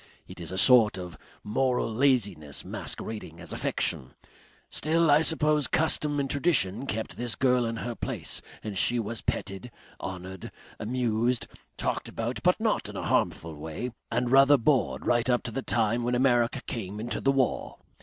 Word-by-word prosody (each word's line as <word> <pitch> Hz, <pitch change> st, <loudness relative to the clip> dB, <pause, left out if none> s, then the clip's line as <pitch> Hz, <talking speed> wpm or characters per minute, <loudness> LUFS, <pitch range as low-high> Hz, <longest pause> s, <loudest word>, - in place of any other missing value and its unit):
It -, -, -11 dB
is -, -, -3 dB
a 95 Hz, -, -4 dB
sort 115 Hz, -2 st, +6 dB
of 90 Hz, -3 st, -7 dB, 0.3 s
moral 125 Hz, +1 st, 0 dB
laziness 105 Hz, -, 0 dB
masquerading 105 Hz, -7 st, -6 dB
as 85 Hz, -, -6 dB
affection.... 65 Hz, 0 st, -1 dB, 0.5 s
Still 160 Hz, 0 st, +2 dB
I 145 Hz, +2 st, +6 dB
suppose 150 Hz, -2 st, +2 dB
custom 150 Hz, -2 st, +1 dB
and 140 Hz, -, 0 dB
tradition 135 Hz, -, 0 dB
kept 110 Hz, -2 st, -4 dB
this 120 Hz, -1 st, -3 dB
girl 125 Hz, -2 st, +2 dB
in 115 Hz, -, -3 dB
her 120 Hz, +1 st, -4 dB
place -, -, -3 dB, 0.2 s
and 105 Hz, -2 st, -5 dB
she 120 Hz, +5 st, +3 dB
was 115 Hz, 0 st, -3 dB
petted, 95 Hz, +5 st, -3 dB, 0.3 s
honoured, 95 Hz, -1 st, -7 dB, 0.3 s
amused, 120 Hz, +1 st, 0 dB, 0.3 s
talked -, -, -2 dB
about -, -, -3 dB
but -, -, +3 dB
not -, -, 0 dB
in -, -, -9 dB
a -, -, -4 dB
harmful 80 Hz, 0 st, 0 dB
way, 80 Hz, +11 st, -5 dB, 0.2 s
and 120 Hz, +1 st, 0 dB
rather 135 Hz, +2 st, +7 dB
bored 130 Hz, +2 st, +1 dB
right 120 Hz, +1 st, +2 dB
up 120 Hz, -1 st, +2 dB
to 115 Hz, -, -5 dB
the 135 Hz, -, -3 dB
time 115 Hz, -1 st, +1 dB
when 120 Hz, +1 st, 0 dB
America 125 Hz, 0 st, +2 dB
came 105 Hz, -3 st, -5 dB
into 120 Hz, +2 st, -3 dB
the 135 Hz, -, +3 dB
war. 135 Hz, -2 st, 0 dB
120 Hz, 165 wpm, -28 LUFS, 105-135 Hz, 0.5 s, rather